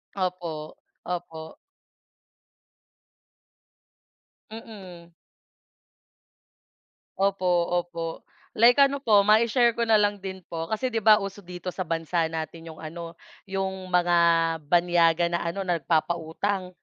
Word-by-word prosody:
Opo, 175 Hz, -5 st, -4 dB, 0.3 s
opo. 165 Hz, -3 st, -6 dB, 2.9 s
Mm. 195 Hz, -6 st, -11 dB, 2.1 s
Opo, 195 Hz, -1 st, +1 dB, 0.3 s
opo. 165 Hz, -1 st, -7 dB, 0.3 s
Like 245 Hz, +5 st, +5 dB
ano 280 Hz, 0 st, +1 dB
po, 210 Hz, -6 st, +4 dB
mai-share 230 Hz, +3 st, +4 dB
ko 235 Hz, -, 0 dB
na 220 Hz, -, +5 dB
lang 205 Hz, -1 st, +2 dB
din 190 Hz, -1 st, -7 dB
po, 165 Hz, -1 st, -5 dB
kasi 235 Hz, +7 st, -2 dB
'di 225 Hz, -, 0 dB
ba 215 Hz, 0 st, +6 dB
uso 195 Hz, +1 st, -6 dB
dito 180 Hz, -1 st, -7 dB
sa 185 Hz, -3 st, -5 dB
bansa 165 Hz, 0 st, -1 dB
natin 165 Hz, +1 st, -6 dB
yung 160 Hz, -1 st, -10 dB
ano, 165 Hz, +1 st, -8 dB, 0.3 s
yung 190 Hz, -1 st, -4 dB
mga 175 Hz, -1 st, +3 dB, 0.5 s
banyaga 170 Hz, 0 st, +3 dB
na 170 Hz, -, 0 dB
ano, 170 Hz, +4 st, -3 dB
na 175 Hz, -2 st, -1 dB
nagpapautang? 175 Hz, +4 st, -2 dB
180 Hz, 110 wpm, -25 LUFS, 170-200 Hz, 2.9 s, ba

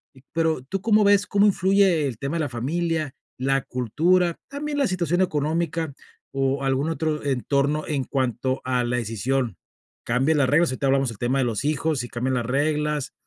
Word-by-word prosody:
y 130 Hz, -, -18 dB
pero, 160 Hz, -5 st, 0 dB
¿tú 190 Hz, +8 st, -4 dB
cómo 215 Hz, 0 st, +4 dB
ves 205 Hz, 0 st, +4 dB
cómo 200 Hz, 0 st, +3 dB
influye 190 Hz, -5 st, +3 dB
el 125 Hz, -5 st, -5 dB
tema 140 Hz, +7 st, -3 dB
de -, -, 0 dB
la 145 Hz, -, -1 dB
familia, 155 Hz, +4 st, -2 dB, 0.2 s
la 135 Hz, +1 st, +1 dB
cultura, 165 Hz, -, +1 dB
también 290 Hz, +1 st, -3 dB
la 275 Hz, -, +3 dB
situación 175 Hz, -2 st, 0 dB
económica 160 Hz, -1 st, -1 dB, 0.4 s
o 135 Hz, 0 st, 0 dB
algún 135 Hz, +3 st, 0 dB
otro 160 Hz, -2 st, -2 dB
entorno 140 Hz, +2 st, 0 dB
en 140 Hz, -4 st, -1 dB
cuanto 130 Hz, -1 st, -1 dB
a 125 Hz, -1 st, 0 dB
la 120 Hz, +1 st, -1 dB
decisión? 115 Hz, -1 st, -1 dB, 0.5 s
¿Cambias 135 Hz, +6 st, +2 dB
las 135 Hz, -3 st, +3 dB
reglas? 160 Hz, +3 st, +3 dB
Ahorita 135 Hz, +2 st, -1 dB
hablamos 135 Hz, -2 st, +2 dB
el 105 Hz, -, -11 dB
tema 125 Hz, +3 st, 0 dB
de 130 Hz, -, +2 dB
los 115 Hz, +2 st, -2 dB
hijos 150 Hz, -2 st, 0 dB
y 120 Hz, -, -7 dB
cambian 125 Hz, +2 st, -2 dB
las 120 Hz, -2 st, -2 dB
reglas, 150 Hz, +1 st, 0 dB
145 Hz, 185 wpm, -24 LUFS, 130-165 Hz, 0.5 s, cómo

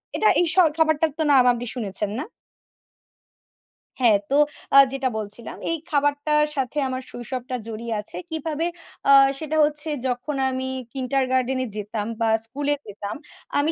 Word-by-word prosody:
এটা 430 Hz, -, +4 dB
এই 350 Hz, -, +4 dB
স -, -, -6 dB, 0.2 s
খাবারটার 315 Hz, -1 st, +2 dB
তো 320 Hz, -, +1 dB
নাম 260 Hz, -3 st, +7 dB
আপনি 240 Hz, +1 st, -5 dB
শুনেছেন 205 Hz, -3 st, -1 dB
না? -, -, -2 dB, 1.8 s
হ্যাঁ। 230 Hz, -5 st, +5 dB
তো 275 Hz, -, +1 dB, 0.4 s
আ -, -, +9 dB
যেটা 270 Hz, -1 st, -1 dB
বলছিলাম। 215 Hz, +2 st, -6 dB
এই 330 Hz, -, 0 dB
খাবারটার 290 Hz, +1 st, +2 dB
সাথে 270 Hz, +2 st, -2 dB
আমার 255 Hz, 0 st, -3 dB
শৈশবটা 250 Hz, +1 st, -5 dB
জড়িয়ে 230 Hz, +1 st, -5 dB
আছে। 210 Hz, -, -6 dB
কিভাবে? 320 Hz, 0 st, -2 dB, 0.4 s
আ 275 Hz, -, +6 dB, 0.3 s
সেটা 315 Hz, 0 st, -3 dB
হচ্ছে 300 Hz, +1 st, -2 dB, 0.2 s
যখন 250 Hz, +4 st, -3 dB
আমি 260 Hz, 0 st, -3 dB, 0.3 s
কিন্ডারগার্ডেনে 260 Hz, -1 st, 0 dB
যেতাম 210 Hz, 0 st, -4 dB, 0.2 s
বা 225 Hz, -, +3 dB, 0.2 s
স্কুলে 285 Hz, +5 st, -1 dB
যেতাম। 205 Hz, 0 st, -6 dB, 0.4 s
আমি 305 Hz, +3 st, +2 dB
260 Hz, 145 wpm, -23 LUFS, 235-295 Hz, 1.8 s, আ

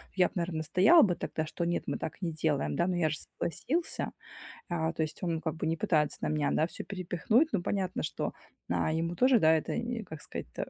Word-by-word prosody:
я 180 Hz, -2 st, +5 dB
б, -, -, -14 dB
наверно, 170 Hz, -2 st, -2 dB
настоял 185 Hz, -, +6 dB
бы 180 Hz, -4 st, +2 dB
тогда, 155 Hz, -, -3 dB
что 155 Hz, -, -4 dB
нет, 170 Hz, 0 st, 0 dB
мы -, -, -1 dB
так -, -, -6 dB
не 170 Hz, -3 st, -2 dB
делаем, 155 Hz, -2 st, 0 dB
да. 170 Hz, -, +2 dB
Но 180 Hz, -1 st, 0 dB
я 160 Hz, -3 st, +2 dB
же 155 Hz, -, -1 dB
согласился". 300 Hz, -, -3 dB, 0.6 s
А, 160 Hz, -2 st, 0 dB
то -, -, -2 dB
есть 155 Hz, -, -6 dB
он 165 Hz, -3 st, -1 dB
как 160 Hz, -2 st, -2 dB
бы 160 Hz, -, -3 dB
не 165 Hz, -, +1 dB
пытается 160 Hz, -5 st, +1 dB
на -, -, 0 dB
меня, 150 Hz, -2 st, +1 dB
да, 155 Hz, -, +3 dB
всё -, -, -8 dB
перепихнуть. 200 Hz, -, +1 dB
Ну, 200 Hz, -, +1 dB
понятно, 185 Hz, 0 st, -1 dB
что, 150 Hz, -, -2 dB, 0.4 s
а, 90 Hz, -, +1 dB
ему 165 Hz, +2 st, -1 dB
тоже, 255 Hz, +1 st, +5 dB
да, 160 Hz, -4 st, +5 dB
это 160 Hz, -, 0 dB
н 235 Hz, -1 st, -3 dB
как 160 Hz, -2 st, -9 dB
сказать-то, 60 Hz, -, -6 dB
170 Hz, 230 wpm, -30 LUFS, 155-190 Hz, 0.6 s, настоял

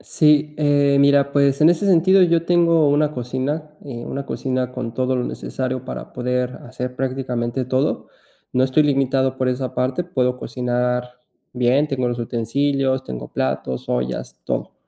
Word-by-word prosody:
Sí, 150 Hz, -1 st, +2 dB
eh, 145 Hz, -1 st, +3 dB
mira, 140 Hz, 0 st, +4 dB
pues, 140 Hz, 0 st, +2 dB
en 160 Hz, -, +7 dB
ese 175 Hz, +4 st, 0 dB
sentido, 190 Hz, +1 st, +5 dB
yo 170 Hz, -2 st, +3 dB
tengo 170 Hz, -3 st, +4 dB
una 150 Hz, +1 st, +2 dB
cocina, 130 Hz, +5 st, -3 dB
eh, 120 Hz, -4 st, -7 dB
una 140 Hz, 0 st, -5 dB
cocina 130 Hz, -1 st, -2 dB
con 125 Hz, -2 st, -5 dB
todo 130 Hz, +2 st, 0 dB
lo 125 Hz, -, -1 dB
necesario 130 Hz, -1 st, -4 dB
para -, -, -7 dB
poder 125 Hz, 0 st, -1 dB, 0.2 s
hacer 125 Hz, 0 st, -5 dB
prácticamente 125 Hz, -1 st, -2 dB
todo. 130 Hz, +2 st, -1 dB, 0.4 s
No 130 Hz, -, +2 dB
estoy 130 Hz, +4 st, +3 dB
limitado 135 Hz, -2 st, +1 dB
por 130 Hz, -, +1 dB
esa 125 Hz, 0 st, -2 dB
parte, 130 Hz, +7 st, -1 dB
puedo 125 Hz, -7 st, -1 dB
cocinar 125 Hz, 0 st, -2 dB, 0.4 s
bien, 125 Hz, +4 st, +2 dB
tengo 130 Hz, -3 st, -1 dB
los 120 Hz, 0 st, -3 dB
utensilios, 130 Hz, +3 st, 0 dB
tengo 60 Hz, -, -7 dB
platos, 65 Hz, -1 st, -3 dB
ollas, 60 Hz, 0 st, -3 dB
todo, -, -, -3 dB
130 Hz, 155 wpm, -21 LUFS, 125-145 Hz, 0.4 s, en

